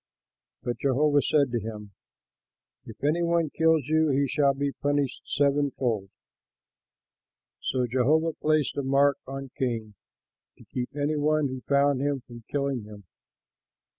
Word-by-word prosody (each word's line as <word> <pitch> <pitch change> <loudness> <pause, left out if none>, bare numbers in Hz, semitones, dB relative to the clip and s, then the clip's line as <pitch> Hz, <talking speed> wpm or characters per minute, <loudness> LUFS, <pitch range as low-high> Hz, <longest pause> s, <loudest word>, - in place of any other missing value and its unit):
But 120 0 -3
Jehovah 145 +2 +3
said 140 -4 +2
to 120 - 0
him, 105 -2 -7 0.9
"If 110 - -12
any 155 +4 +2
one 170 -3 +1
kills 160 -2 +3
you, 155 +1 +2
he 140 0 +2
shall 140 +1 +2
be 140 +1 -1
punished 145 -2 -1
sevenfold." 140 -7 0 1.5
So 125 -1 0
Jehovah 145 +7 +2
placed 155 -2 0
a - - +1
mark 140 +1 +3
on 135 -1 -6
Cain, 115 -4 -2 0.6
to - - -16
keep 125 -1 -2
any 150 +1 0
one 150 -1 +2
who 130 0 -6
found 140 -1 +3
him 140 -1 0
from 120 -2 -13
killing 140 -3 -1
him. 105 -1 -12
140 Hz, 135 wpm, -27 LUFS, 125-145 Hz, 1.5 s, Jehovah